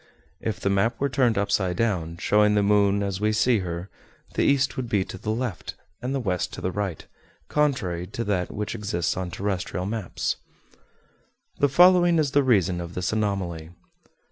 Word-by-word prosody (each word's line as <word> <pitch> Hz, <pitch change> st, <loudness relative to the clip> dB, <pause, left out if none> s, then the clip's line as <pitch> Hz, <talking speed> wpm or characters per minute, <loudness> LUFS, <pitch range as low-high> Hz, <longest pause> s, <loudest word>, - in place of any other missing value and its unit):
If 105 Hz, -4 st, -3 dB
the 100 Hz, -, 0 dB
map 100 Hz, +4 st, +1 dB
were 140 Hz, -, +1 dB
turned 125 Hz, -4 st, +2 dB
upside 95 Hz, -3 st, 0 dB
down, 85 Hz, -7 st, -1 dB
showing 105 Hz, +3 st, +3 dB
the 105 Hz, -, +3 dB
moon 100 Hz, 0 st, +3 dB
as 100 Hz, -1 st, -3 dB
we 105 Hz, 0 st, +2 dB
see 110 Hz, +1 st, +3 dB
her, 85 Hz, 0 st, -4 dB, 0.5 s
the -, -, 0 dB
east 140 Hz, 0 st, +2 dB
would 125 Hz, -3 st, -4 dB
be 100 Hz, -4 st, +1 dB
to -, -, -8 dB
the 105 Hz, -, -5 dB
left, 110 Hz, -3 st, -3 dB, 0.3 s
and 125 Hz, -, -3 dB
the -, -, 0 dB
west 95 Hz, -7 st, -1 dB
to -, -, -6 dB
the 95 Hz, -, -1 dB
right, 95 Hz, -4 st, -3 dB, 0.4 s
contrary 115 Hz, -, 0 dB
to 115 Hz, +4 st, -4 dB
that 95 Hz, -5 st, -1 dB
which 105 Hz, 0 st, -4 dB
exists 100 Hz, -6 st, -2 dB
on 90 Hz, -1 st, -3 dB
terrestrial 90 Hz, -1 st, -3 dB
maps. 105 Hz, -2 st, -2 dB, 1.2 s
The 145 Hz, -, +4 dB
following 175 Hz, +3 st, +6 dB
is 150 Hz, -4 st, +1 dB
the 145 Hz, -, +4 dB
reason 95 Hz, -9 st, +2 dB
of 85 Hz, 0 st, -8 dB
this 90 Hz, +3 st, -1 dB
anomaly. 95 Hz, -7 st, -2 dB
100 Hz, 180 wpm, -25 LUFS, 90-120 Hz, 1.2 s, following